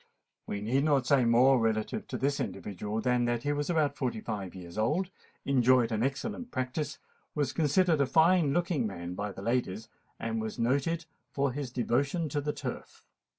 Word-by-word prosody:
We 100 - -3
need 130 +6 +1
not 140 -4 +3
say 135 -2 +4
more 125 +3 +5
relative 110 -1 -1
to - - -4
this 140 +1 0
individual 105 +2 -3
than 125 0 +2
that 120 0 -1
he 145 - +1
was 145 +2 -2
about 155 -4 +2
five 125 -3 -1
and 110 - -8
forty 100 -5 -4
years 85 -1 -10
old, 155 - 0 0.3
enjoyed 125 -3 +4
an 110 -1 0
excellent 210 - -2
practice, 140 - -3 0.4
was 145 -4 0
considered 160 +1 +3
a 140 - +2
fine 165 0 +4
looking 165 -6 +1
man 85 -3 -6
by 100 +2 -3
the 95 - -9
ladies, 110 -2 -1 0.3
and 115 -1 -2
was 110 +1 -5
noted 140 +8 0 0.2
for 140 -1 0
his 140 0 -4
devotion 140 +7 0
to 145 +1 -1
the 150 +1 -1
Turf. 140 -4 -7
130 Hz, 185 wpm, -30 LUFS, 115-145 Hz, 0.4 s, more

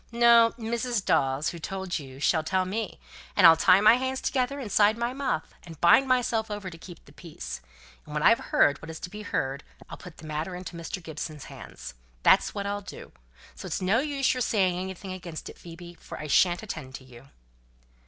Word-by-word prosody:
No; 235 -1 +6
Mrs. 235 -1 -2
Dawes, 135 +2 +1
who 170 - -8
told 190 +1 -4
you, 135 -2 -11
shall 160 +2 +2
tell 185 +3 0
me, 210 +3 -4 0.4
and - - +5
I'll 165 - +10
tie 185 +4 +5
my 215 +3 +7
hands 260 +1 -2
together 265 +1 -1
inside 215 -3 +2
my 235 +1 -2
muff, 260 - -3
and 165 -3 -12
bind 220 +10 +5
myself 240 -3 +1
over 205 -3 -5
to 165 - -11
keep 175 -1 -12
the - - -17
peace. 145 - -8 0.4
And - - -9
when - - -1
I've - - +6
heard 145 - +3
what 165 - -10
is 160 - -7
to 180 - -7
be 210 +1 -8
heard, 140 -8 -3 0.3
I'll - - -7
put 180 -3 -12
the - - -12
matter 155 +4 -4
into 180 -1 -8
Mr. 170 +2 -6
Gibson's 155 -2 -6
hands. - - -10 0.3
That's - - +4
what 200 -1 -3
I'll 205 0 -2
do. 195 - -11 0.4
So - - -9
it's - - -2
no 190 +5 +2
use 280 -2 0
your 255 - -3
saying 190 -6 +1
anything 190 0 -6
against 175 -3 -8
it, - - -13
Phoebe, 175 0 -11
for - - -10
I - - -7
shan't 175 +6 +3
attend 155 -10 -7
to 135 - -10
you." 125 0 -15
185 Hz, 210 wpm, -27 LUFS, 160-225 Hz, 0.4 s, I'll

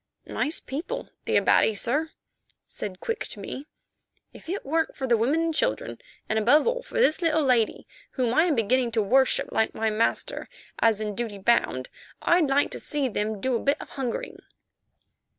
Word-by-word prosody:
"Nice 305 - -1
people, 285 +6 -5 0.2
the - - +2
Abati, 220 - +4
sir," 290 +10 0 0.6
said 185 -3 -6
Quick 460 +1 -3
to - - -8
me. 280 +3 -7 0.7
"If - - -13
it 390 +3 -3
weren't 320 +3 0
for 270 - -3
the 240 -2 +3
women 260 +9 +1
and 330 0 0
children, - - -1 0.3
and, 220 - +1
above 250 +8 +5
all, - - 0
for - - -13
this 365 -8 +3
little 320 -2 +2
lady, 245 -5 +2 0.3
whom 245 -3 0
I 320 +6 +4
am 330 -5 +2
beginning 240 +2 +2
to 220 - +2
worship 260 +6 +2
like 220 - +1
my 220 0 0
master, 215 +2 -1 0.3
as 225 -2 +3
in 210 -1 -2
duty 225 -1 -4
bound, 190 - +1 0.3
I'd 340 -3 +3
like 275 +1 +2
to - - -6
see 285 -3 -2
them 210 -1 -2
do 255 +4 0
a - - +1
bit 280 +4 +1
of - - -9
hungering." 260 -4 -4
260 Hz, 185 wpm, -26 LUFS, 220-310 Hz, 0.7 s, above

